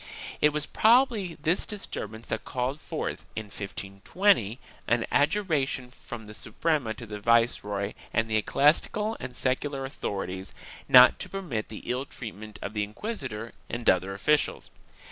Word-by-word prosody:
It 150 - +6
was 150 0 0
probably 220 - +3
this 165 +5 +2
disturbance 110 - -6
that 110 - -3
called 130 +3 -2
forth, - - -4
in 110 - -3
1520, 105 - 0 0.3
an 120 -1 +2
adjuration 145 -6 +1
from 120 -2 -9
the 105 - -10
Suprema 140 -1 -1
to 115 - -8
the 105 -1 -6
viceroy 105 -3 +2 0.2
and 115 0 +1
the 110 -1 +1
ecclesiastical 170 - +2
and 130 -1 -6
secular 135 +2 -1
authorities, 95 -7 -4 0.4
not - - +9
to - - -5
permit 170 - -4
the 110 - -8
ill 125 +2 -1
treat 120 -5 -7
ment 105 0 -10
of 100 - -4
the 105 -1 0
inquisitor 115 - -5 0.2
and 120 0 -4
other 95 +1 -1
officials. 150 +9 +1
120 Hz, 145 wpm, -28 LUFS, 105-150 Hz, 0.4 s, not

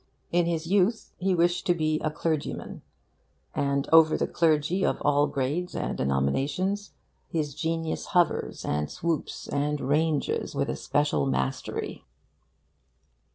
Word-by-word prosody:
In 175 0 +3
his 165 -1 -1
youth 200 +5 +1
he 185 0 +1
wished 175 +3 +1
to 175 - +4
be 155 -1 0
a 155 - -1
clergyman; 155 -1 -3 0.7
and 140 0 0
over 160 -1 +7
the - - +1
clergy 165 +3 +1
of - - +1
all 145 0 +3
grades 145 +7 -2
and - - -2
denominations 135 - 0 0.4
his 150 -3 -2
genius 165 +2 -2
hovers 175 -4 +1
and 75 0 -1
swoops 165 -2 -3
and 145 +1 -1
ranges 150 +2 0
with - - 0
a - - -3
special 145 -1 +1
mastery. 135 0 -2
155 Hz, 130 wpm, -27 LUFS, 145-175 Hz, 0.7 s, over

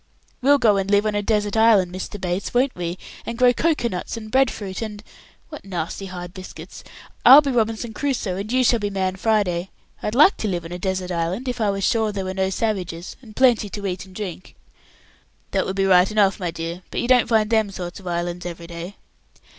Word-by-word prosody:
We'll 285 +3 +5
go 220 -6 +3
and 195 0 -1
live 205 +1 +3
on 215 - 0
a 205 - 0
desert 210 0 0
island, 215 -5 +4
Mr. 190 +2 -6
Bates, 185 +4 -3
won't 260 +2 +3
we, 175 0 -4 0.3
and 235 - -5
grow 250 0 +5
cocoa 300 -2 +1
nuts 185 +2 -4
and 215 -1 -8
bread 265 -1 +4
fruit, 195 -3 -6
and 210 -2 -6 0.5
what 300 - -9
nasty 185 +1 -4
hard 180 -1 -8
biscuits! 185 -1 -10 0.4
I'll 270 +4 +10
be 280 -2 -2
Robinson 225 -1 -1
Crusoe, 245 -7 -2
and 205 +3 -5
you 255 0 +3
shall 235 -1 +3
be 205 -1 -2
Man 190 -1 -1
Friday. 190 -4 0 0.3
I'd 210 - -3
like 305 +9 +6
to 220 - -2
live 175 -4 -2
on 165 - -8
a 180 - -5
desert 185 -1 -2
island, 175 +9 -2
if 245 -1 -3
I 210 - +2
was 195 0 -2
sure 220 0 +2
there 195 -2 -4
were 185 - -3
no 190 0 0
savages, 185 -4 -3
and 220 -4 -14
plenty 245 -5 +3
to 200 0 -6
eat 185 0 -4
and 185 - -16
drink." 185 -4 -7 1.0
"That - - 0
would 190 - -3
be 195 0 +1
right 185 -1 +5
enough, 210 -2 +2
my 180 -3 -2
dear, 165 +2 -5
but - - -3
you 240 - -1
don't 250 -1 +4
find 220 -1 +2
them 220 -2 +2
sort 180 -2 -7
of 190 - -11
islands 175 0 -3
every 170 -1 -7
day." 170 +3 -8
200 Hz, 225 wpm, -22 LUFS, 180-225 Hz, 1.0 s, I'll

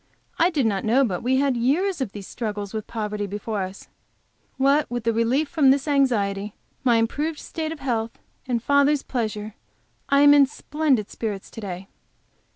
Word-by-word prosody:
I 340 - +5
did 295 -8 0
not 200 -3 0
know 250 +5 +3
but 185 -6 -3
we 255 +2 +1
had 275 -1 +2
years 300 +9 +1
of 240 -7 -2
these 200 -1 -8
struggles 205 -3 -5
with 215 -2 -4
poverty 210 -2 -3
before 205 +1 -3
us. 190 +1 -7 0.7
What 275 +3 +3
with 240 -1 -3
the 230 0 +1
relief 240 +7 +1
from 280 -2 +3
this 275 +2 +3
anxiety, 210 -8 +1 0.3
my 245 -3 +4
improved 290 +8 0
state 315 0 -5
of 320 -3 -8
health, 230 -4 -2 0.3
and 235 -2 -1
father's 285 +1 +3
pleasure, 215 -4 -3 0.6
I 280 0 +4
am 290 0 +8
in 285 -2 +6
splendid 285 -6 -1
spirits 205 -4 -5
to 225 - -8
day. 190 -1 -6
240 Hz, 175 wpm, -24 LUFS, 210-280 Hz, 0.7 s, am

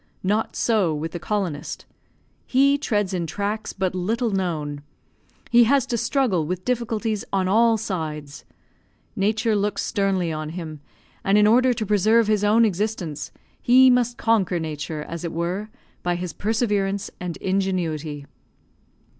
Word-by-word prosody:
Not 210 +4 0
so 200 -9 +2
with 160 +2 -4
the 175 - -5
colonist. 175 -6 -3 0.6
He 275 +2 +4
treads 205 -8 0
in 175 -2 -2
tracks 205 +6 -3
but 190 -2 -2
little 220 +6 -1
known; 155 -7 -2 0.7
he 240 0 +7
has 275 +2 +3
to 240 - -2
struggle 235 - +1
with 180 +4 -4
difficulties 225 -3 -1
on 190 -1 +1
all 225 +3 +4
sides. 155 -8 -5 0.7
Nature 220 +2 +1
looks 205 0 0
sternly 195 -5 0
on 155 0 -4
him, 160 -3 -7 0.4
and 195 +1 +3
in 210 - +5
order 250 +4 +5
to 220 -2 -3
preserve 215 +3 +3
his 210 -1 +1
own 220 +3 +5
existence, 195 -6 -2 0.3
he 255 +1 +6
must 245 -1 +1
conquer 205 -6 +2
Nature, 155 -1 -4
as 170 +1 -7
it 170 - -3
were, 180 +6 -2 0.3
by 175 0 0
his 175 -2 -4
perseverance 205 -1 -1
and 180 -2 -5
ingenuity. 165 -6 -2
195 Hz, 145 wpm, -23 LUFS, 170-220 Hz, 0.7 s, he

